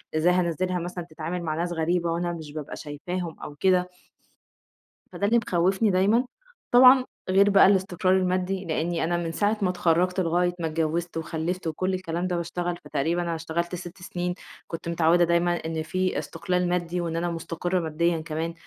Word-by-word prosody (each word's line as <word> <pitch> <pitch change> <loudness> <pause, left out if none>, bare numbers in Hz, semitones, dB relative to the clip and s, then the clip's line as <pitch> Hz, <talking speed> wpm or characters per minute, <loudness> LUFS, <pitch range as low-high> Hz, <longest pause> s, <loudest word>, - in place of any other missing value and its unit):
إزاي 170 +3 +3
هانزلها 180 +1 0
مثلًا 175 +1 -5
تتعامل 165 +3 -4
مع 155 -2 -2
ناس 175 +2 -2
غريبة 170 +1 0
وأنا 175 +1 -1
مش 160 -3 -8
بابقى 150 -2 -6
شايفاهم 165 +3 -5
أو 145 - -8
كده 180 +2 +2 1.2
فده 200 - -2
اللي 235 +3 +4
مخوفني 190 +5 +2
دايمًا، 200 +6 +3 0.5
طبعًا 255 +1 +8 0.2
غير 195 +2 +5
بقى 200 - +7
الاستقرار 185 -1 +2
المادي، 185 +1 -1
لإني 165 +1 -1
أنا 175 +2 0
من 170 -1 -2
ساعة 205 +6 +1
ما 190 - +2
اتخرّجت 180 +1 +1
لغاية 175 0 +1
ما 165 - -1
اتجوّزت 165 +2 -2
وخلّفت 165 +2 -3
وكلّ 185 +4 -1
الكلام 180 -1 -2
ده 180 - -1
باشتغل 175 +1 -3
فتقريبًا 160 +4 0
أنا 170 -1 -2
اشتغلت 170 +2 -3
6 180 +1 -9
سنين، 180 0 -3 0.3
كنت 165 0 -6
متعوّدة 170 +1 +3
دايمًا 170 +1 +2
إن 160 -1 -2
في 185 +3 -1
استقلال 180 +1 -1
مادي 175 0 -1
وإن 165 -1 -3
أنا 175 +1 -1
مستقرة 170 +2 -2
ماديًا 165 0 0
كمان، 160 +1 -3
175 Hz, 170 wpm, -26 LUFS, 165-185 Hz, 1.2 s, طبعًا